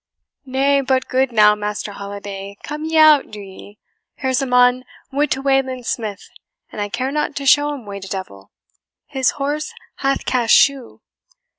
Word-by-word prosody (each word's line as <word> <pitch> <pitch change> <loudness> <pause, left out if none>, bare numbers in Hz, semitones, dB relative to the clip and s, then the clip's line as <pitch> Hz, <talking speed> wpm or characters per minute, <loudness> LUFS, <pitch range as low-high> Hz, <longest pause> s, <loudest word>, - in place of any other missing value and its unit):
"Nay, 275 +2 +2
but, 260 -1 0
good 260 0 +1
now, 210 -2 +6
Master 210 0 -4
Holiday, 200 0 -8
come 300 +1 -5
ye 320 0 -1
out, 310 -2 +6
do 210 - -9
ye. 200 +1 -12 0.4
Here's 260 0 -1
a 270 - -2
mon 250 0 +4 0.3
would 290 +2 +1
to 270 - -2
Wayland 265 -2 0
Smith, 215 -4 -4 0.4
and - - -6
I 205 - -2
care 255 +5 -2
not 300 0 -2
to 280 - -4
show 290 +2 +4
him 275 -6 -7
way 200 -1 -7
to 195 - -9
devil; 145 - -7 0.6
his 265 -2 0
horse 290 +2 -3 0.2
hath 275 0 -1
cast 240 -3 +3
shoe." 275 -3 +2
255 Hz, 170 wpm, -19 LUFS, 205-275 Hz, 0.6 s, now